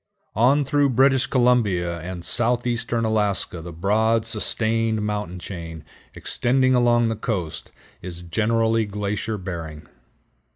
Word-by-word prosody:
On 135 +7 +3
through 145 +1 +2
British 130 +1 +3
Columbia 105 -10 +2
and 90 +1 -7
southeastern 120 -1 +1
Alaska 105 -5 -1
the 85 +1 -8
broad, 110 +6 +1
sustained 110 0 -1
mountain 105 -4 -3
chain, 85 -3 -8 0.3
extending 130 +1 +1
along 120 -2 +3
the 115 - -1
coast, 100 -7 -4 0.3
is 90 -1 -8
generally 110 +5 +1
glacier 105 +2 -3
bearing. 85 -5 -7
110 Hz, 115 wpm, -23 LUFS, 90-120 Hz, 0.3 s, On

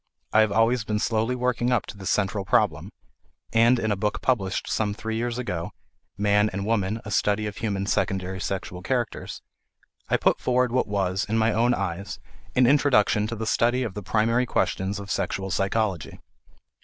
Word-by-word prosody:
I 110 - +5
have 110 -2 +4
always 115 +2 +2
been 105 +1 -1
slowly 115 +3 0
working 125 0 0
up 125 - +1
to - - -9
this 95 -2 -5
central 100 0 0
problem; - - +1 0.6
and 115 +2 +5
in 110 -2 -1
a - - +2
book 105 +2 -1
published 105 -7 0
some 105 -2 -1
three 110 +1 -4
years 120 +1 -2
ago 90 -9 -4 0.4
Man 105 +1 +3
and 100 +1 -4
Woman: 110 -1 0
a 105 - -6
Study 105 +1 +1
of 105 -1 -5
Human 100 -3 -2
Secondary 95 -1 -1
Sexual 90 -2 -4
Characters 120 +2 -3 0.7
I - - +3
put - - +2
forward 125 -1 +1
what 130 +1 +1
was, 95 -1 0
in 110 - +1
my 110 0 +2
own 120 +2 +2
eyes, 95 0 -4 0.4
an 125 - +5
introduction 120 -6 +3
to 115 - -4
the 110 0 -4
study 120 +3 +2
of 110 -6 -4
the 105 - -5
primary 115 +5 +1
questions 95 -2 -1
of 100 -1 -7
sexual 95 0 -2
psychology. 95 -1 -1
105 Hz, 180 wpm, -25 LUFS, 100-115 Hz, 0.7 s, I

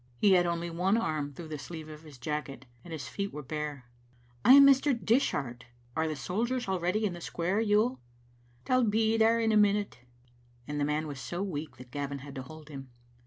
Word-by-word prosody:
He 200 - +4
had 175 -2 +5
only 170 0 -2
one 185 +6 +2
arm 155 -10 -1
through 160 +3 -9
the 150 -2 -5
sleeve 160 +2 -8
of 155 -1 -10
his 150 -4 -13
jacket, 140 +1 -4 0.2
and 175 - -11
his 155 -4 -5
feet 200 0 -4
were 150 - -7
bare. 150 -2 -5 0.3
" 120 0 -32
I 255 - +8
am 280 0 +10
Mr. 275 -1 +5
Dishart. 140 - 0 0.3
Are 160 0 +1
the 155 - -2
soldiers 230 - -2
already 190 +3 0
in 195 - -1
the 175 - -9
square, 180 +6 -1
Yuill?" 220 +4 +2 0.7
"They'll 255 0 +3
be 220 0 +2
there 225 +1 +4
in 225 -1 +2
a 215 - +4
minute." 205 -7 +2 0.7
The 150 - -6
man 150 +2 0
was 145 -3 -6
so 175 +7 -4
weak 160 -5 -5
that 125 -1 -13
Gavin 140 0 -3
had 140 - -9
to 135 - -5
hold 155 +3 -12
him. 135 -3 -9
170 Hz, 210 wpm, -30 LUFS, 145-210 Hz, 0.7 s, am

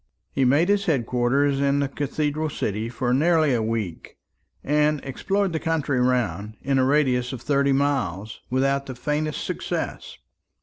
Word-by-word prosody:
He 135 - +1
made 145 +7 +4
his 200 0 +2
head 135 -8 +1
quarters 135 +4 +1
in 140 0 +2
the 140 - +1
cathedral 150 +2 -2
city 110 -4 -3
for 125 +1 -1
nearly 155 0 +3
a 120 - +1
week, 110 -6 -4 0.5
and 150 +1 +2
explored 195 +7 -1
the 160 - -1
country 155 -5 0
round, 120 -4 0
in 135 0 +1
a - - +4
radius 130 -3 +2
of 120 - -7
thirty 140 -1 +2
miles, 125 -8 -1
without 135 +2 +1
the 130 - -6
faintest 150 +4 -2
success. - - -4
140 Hz, 160 wpm, -24 LUFS, 125-150 Hz, 0.5 s, made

